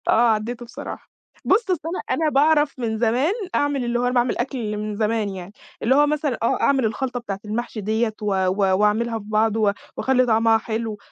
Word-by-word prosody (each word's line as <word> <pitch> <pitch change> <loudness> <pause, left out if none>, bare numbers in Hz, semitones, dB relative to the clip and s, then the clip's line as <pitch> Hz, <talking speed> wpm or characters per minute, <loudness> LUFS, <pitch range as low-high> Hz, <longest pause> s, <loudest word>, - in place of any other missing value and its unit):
آه 235 +1 +5
عدّيته 230 +3 -3
بصراحة. 240 - -9 0.3
بُصّ، 430 +2 +2
أصل 360 - +1
أنا 350 - -3 0.2
أنا 320 -1 +2
باعرف 295 0 +3
من 225 -2 -2
زمان 245 - +2 0.2
أعمل 285 -2 +1
اللي 240 0 0
هو - - -1
أنا 250 - 0
باعمل 245 0 +1
أكْل 235 -4 -3
من 210 0 -4
زمان 215 0 0
يعني، 190 0 -8 0.3
اللي 260 +4 +3
هو 295 +1 +5
مثلًا 295 -2 -1
آه - - +1
أعمل 270 -3 +3
الخلطة 245 +3 -2
بتاعة 200 -5 -5
المحشي 220 +1 -4
ديّة 220 +2 0
و - - -4 0.2
و 185 - +1 0.2
واعملها 225 +2 +1
في 205 - -12
بعض 215 +1 +1
و 210 -2 +3 0.3
واخلّي 255 -1 +2
طعمها 225 -1 +4
حلو، 220 -1 -4
235 Hz, 200 wpm, -22 LUFS, 215-265 Hz, 0.3 s, آه